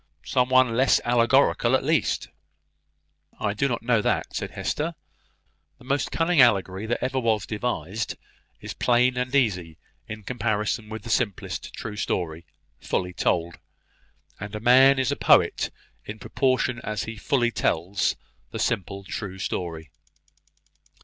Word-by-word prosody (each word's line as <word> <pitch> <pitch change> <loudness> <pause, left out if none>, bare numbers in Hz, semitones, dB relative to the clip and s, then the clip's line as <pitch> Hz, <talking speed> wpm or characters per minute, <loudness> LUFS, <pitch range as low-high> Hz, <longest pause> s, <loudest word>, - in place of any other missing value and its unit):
"Some 125 0 +1
one 130 -3 +4
less 130 +2 +4
allegorical, 120 +1 +3
at - - 0
least." 155 +3 0 1.1
"I 105 -1 -1
do 135 +6 0
not 115 -4 -3
know 115 -2 +2
that," - - -1
said - - -3
Hester. - - -3 0.8
"The - - -18
most 140 +3 -1
cunning 165 -2 +3
allegory 100 -3 +2
that 120 - -1
ever 130 +1 0
was 110 -5 0
devised 105 -2 -3 0.4
is - - -7
plain 125 +1 +2
and 125 +2 -2
easy 90 - +1 0.3
in 110 -1 -7
comparison 110 -2 -2
with 110 0 -7
the 115 - -5
simplest 110 -6 -2
true 105 - -6
story, 85 -4 -3 0.3
fully 90 -1 -2
told: 85 -1 -1 0.8
and 105 +1 -7
a - - -3
man 130 +4 +6
is 130 0 +1
a - - 0
poet - - +3 0.3
in 105 - -7
proportion 125 +2 0
as 110 0 -3
he 115 - -6
fully 120 +2 +1
tells 95 -1 0 0.4
a - - -5
simple 100 -3 -2
true 95 0 -6
story." 85 -4 -4
115 Hz, 145 wpm, -25 LUFS, 100-125 Hz, 1.1 s, man